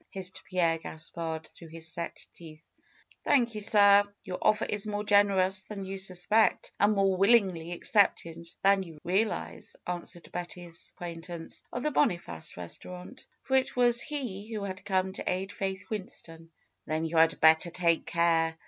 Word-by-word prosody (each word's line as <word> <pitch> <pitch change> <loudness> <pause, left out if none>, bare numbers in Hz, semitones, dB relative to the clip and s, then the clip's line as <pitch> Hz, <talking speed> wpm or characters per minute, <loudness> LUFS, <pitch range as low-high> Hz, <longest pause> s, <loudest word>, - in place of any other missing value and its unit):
hissed 185 -1 -4
Pierre 170 -3 +1
Gaspard 160 0 -5
through 170 - -13
his 160 0 -8
set 170 0 -5
teeth. 160 -2 -13 0.6
Thank 240 -4 +3
you, 215 - -5
sir! 200 -1 +6 0.2
Your 185 -1 -5
offer 215 +1 +3
is 205 0 -2
more 210 0 -2
generous 195 -2 +3
than 200 0 -7
you 195 0 -5
suspect, 190 +4 +1
and 205 +1 +4
more 195 -2 +2
willingly 190 -5 +3
accepted 170 -3 +1
than 195 0 +5
you 165 -4 -9
real 200 +5 +2
ize," - - -7
answered 175 -1 -6
Betty's 175 -1 -7
acquaintance 170 -1 -7
of 245 - -4
the 300 - +1
Boniface 170 - -1
restaurant, 180 - -9 0.2
for 265 - 0
it 260 -1 +2
was 240 -1 +4
he 230 -8 -5
who 215 -2 -3
had 185 -1 -5
come 190 -1 0
to - - -2
aid 190 +2 -3
Faith 190 0 -4
Winston. 165 -5 -7 0.4
"Then 155 +1 -1
you 165 +1 -2
had 160 0 +4
better 160 +2 +5
take 170 -1 +1
care. 165 -1 +2
185 Hz, 160 wpm, -29 LUFS, 170-205 Hz, 0.6 s, sir